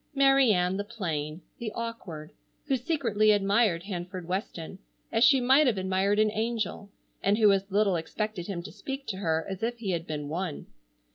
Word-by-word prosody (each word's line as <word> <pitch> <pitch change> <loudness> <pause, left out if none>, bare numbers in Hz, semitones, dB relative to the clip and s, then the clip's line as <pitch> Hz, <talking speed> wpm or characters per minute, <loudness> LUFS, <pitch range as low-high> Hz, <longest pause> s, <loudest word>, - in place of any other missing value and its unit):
Mary 270 -3 +5
Ann, 180 -1 +1
the 205 - -2
plain, 170 -7 -4 0.2
the 225 -3 -4
awkward, 195 -10 -6 0.3
who 275 -3 +1
secretly 245 - +1
admired 200 -3 +3
Hanford 180 -2 -6
Weston 185 -1 -4 0.3
as 225 +1 +3
she 270 -1 +6
might 265 +4 +5
have 230 -5 +2
admired 190 +2 +1
an 215 0 +3
angel, 220 -2 -2 0.3
and 200 +2 +2
who 215 -2 +6
as 195 0 0
little 200 -1 +2
expected 175 +3 -3
him 180 -4 -4
to - - -9
speak 270 0 -6
to 190 - -4
her 160 -4 0
as 190 -1 -5
if 235 +1 -1
he 210 -5 -3
had 170 -1 -3
been 150 -2 -4
one. 165 0 -4
200 Hz, 185 wpm, -28 LUFS, 180-230 Hz, 0.3 s, she